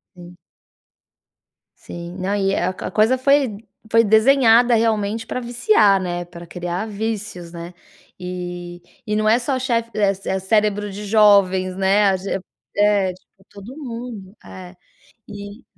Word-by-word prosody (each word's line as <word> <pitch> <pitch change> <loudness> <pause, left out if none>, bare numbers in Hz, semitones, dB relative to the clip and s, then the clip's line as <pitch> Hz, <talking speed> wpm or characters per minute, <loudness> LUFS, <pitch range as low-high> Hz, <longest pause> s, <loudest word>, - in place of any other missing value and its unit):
Sim. 175 0 -13 1.4
Sim, 170 0 -9
não, 190 +2 -2
e 195 -1 0
a 185 +1 -1 0.2
coisa 220 +5 +3
foi 270 -5 +2 0.3
foi 230 0 +4
desenhada 235 +2 +5
realmente 220 -1 0
pra 255 - -4
viciar, 235 - +3
né, 175 -1 -4
pra 175 0 -12
criar 175 +3 -4
vícios, 210 -5 -5
né, 170 +1 -8 0.5
e 175 -1 -7 0.3
e 210 - -1
não 215 0 +1
é 225 +3 +4
só 260 +2 -2
chefe 235 -3 -1
é 200 -2 +2 0.3
cérebro 210 +1 0
de 205 +2 -7
jovens, 195 -3 +4
né, 195 +2 +3
a 190 - +1
ge 195 +2 -7 0.5
é 205 -2 +2
tipo 190 +1 -25
todo 205 +6 -11
mundo. 230 -7 -8
É, 185 0 -11 0.5
e 205 +2 -10
205 Hz, 135 wpm, -20 LUFS, 185-225 Hz, 1.4 s, desenhada